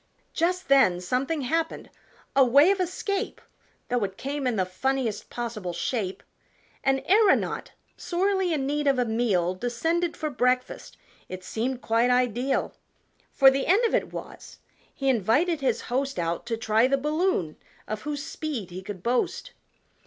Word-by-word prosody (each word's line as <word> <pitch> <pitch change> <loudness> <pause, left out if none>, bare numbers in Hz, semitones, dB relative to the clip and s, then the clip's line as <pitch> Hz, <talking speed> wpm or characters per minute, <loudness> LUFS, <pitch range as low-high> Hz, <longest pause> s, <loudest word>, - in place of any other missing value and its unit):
Just 360 +3 0
then 270 -11 +5
something 260 - -1
happened 325 +5 -2 0.4
a 270 - +7
way 280 +8 +6
of 400 - 0
escape, 385 +3 -2 0.5
Though 245 -3 0
it 195 -1 -4
came 280 0 -3
in 245 - 0
the 190 -3 +1
funniest 240 +3 -2
possible 220 -7 -4
shape 190 +2 -3 0.6
An 270 0 +1
aeronaut, 410 +1 +3 0.2
sorely 380 0 0
in 290 -4 0
need 295 +1 -1
of 275 -2 +3
a 250 - +2
meal, 215 -6 +1
Descended 325 - -1
for 310 -1 -3
breakfast 250 -1 -1 0.3
it 185 0 -7
seemed 245 +6 -3
quite 230 +2 +2
ideal! 250 +1 +1 0.6
For 270 -1 +6
the 270 0 -1
end 410 +7 +4
of 455 - 0
it - - 0
was, - - -9 0.3
he 275 - -4
invited 270 - +2
his 250 -4 0
host 270 +3 -2
Out 170 0 -2
to 230 -1 -1
try 225 +2 +3
the 275 +1 +2
balloon, 300 - 0 0.3
of 215 0 -4
whose 295 -1 -4
speed 300 - -5
he 185 +2 -6
could 190 -2 -8
boast. 245 +1 -1
260 Hz, 155 wpm, -26 LUFS, 225-305 Hz, 0.6 s, a